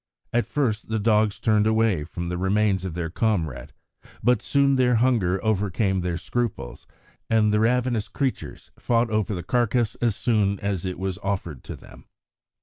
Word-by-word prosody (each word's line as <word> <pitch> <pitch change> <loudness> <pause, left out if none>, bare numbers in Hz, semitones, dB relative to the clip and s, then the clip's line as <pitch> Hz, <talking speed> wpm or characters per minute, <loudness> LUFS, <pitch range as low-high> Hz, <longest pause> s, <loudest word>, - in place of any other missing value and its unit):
At 120 0 +1
first 115 -8 -1
the 110 - 0
dogs 105 -1 +2
turned 110 -1 +2
away 110 -7 +2
from 85 +1 -5
the 90 - -3
remains 95 0 +1
of 85 -3 -5
their 85 -2 -3
comrade, 80 - -1 0.5
but 125 -1 +3
soon 140 -1 +2
their 125 -2 +3
hunger 110 -6 +2
overcame 100 -2 0
their 90 -1 -2
scruples, 95 - -4 0.4
and 110 -2 +3
the 105 - +3
ravenous 120 -1 +1
creatures 135 -3 -4
fought 115 -1 +1
over 105 -1 0
the 90 - -5
carcase 120 +2 +1
as 115 -4 +1
soon 100 -5 +1
as 100 -3 -2
it 90 -1 -3
was 95 0 -3
offered 95 - -4
to - - -6
them. - - -15
105 Hz, 165 wpm, -24 LUFS, 95-115 Hz, 0.5 s, but